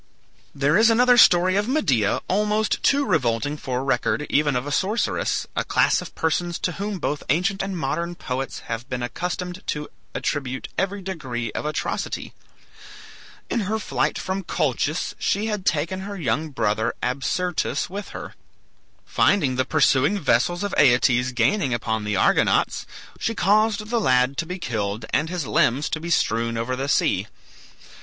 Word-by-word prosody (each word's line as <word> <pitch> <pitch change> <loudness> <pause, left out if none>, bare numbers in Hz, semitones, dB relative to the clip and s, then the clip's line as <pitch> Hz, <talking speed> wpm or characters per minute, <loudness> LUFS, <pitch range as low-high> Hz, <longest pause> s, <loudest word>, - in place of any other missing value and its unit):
There 145 +6 +3
is 225 +1 +6
another 245 +2 +5
story 185 -5 +6
of 205 +1 0
Medea 140 - +1
almost 210 +2 +1
too 280 0 +3
revolting 145 - 0
for 130 -3 -3
record 140 +2 0
even 145 -2 +2
of 125 +2 -1
a 145 - -4
sorceress, 200 +9 0
a - - 0
class - - +2
of - - -10
persons 170 +1 0
to 180 - -2
whom 200 +2 -4
both 150 -3 -2
ancient 180 +7 +1
and 195 -1 -3
modern 170 +4 -2
poets 135 -3 -4
have 115 +3 -6
been 125 -1 -3
accustomed 180 +6 -4
to 150 0 -3 0.3
attribute 130 -3 -3
every 195 +1 -2
degree 130 - -4
of - - -4
atrocity. 150 - -3 1.1
In - - -1
her 220 - +1
flight 220 - -1
from 190 +1 -3
Colchis 155 -1 -1
she 205 +2 0
had 210 -4 -3
taken 165 +5 0
her 200 +1 -6
young 155 0 -1
brother 110 -3 0
Absyrtus 140 +8 -1
with 200 +2 -6
her. - - -8 0.7
Finding 145 -11 +2
the 130 0 +1
pursuing 145 +4 +3
vessels 170 +3 +1
of 205 - -3
Aeetes 125 -1 +4
gaining 125 - +1
upon 110 -2 -2
the 105 -1 -1
Argonauts, 95 - +2 0.3
she 225 - -1
caused 210 +2 +2
the 235 -1 +1
lad 130 -4 +3
to 165 - -2
be 180 +2 -4
killed 110 - -3
and 160 - +1
his 175 -4 -3
limbs 125 +5 +2
to 155 - -2
be 170 +2 -6
strewn 115 -6 +1
over 115 +3 -2
the 135 +2 -3
sea. - - +2
155 Hz, 160 wpm, -23 LUFS, 125-195 Hz, 1.1 s, is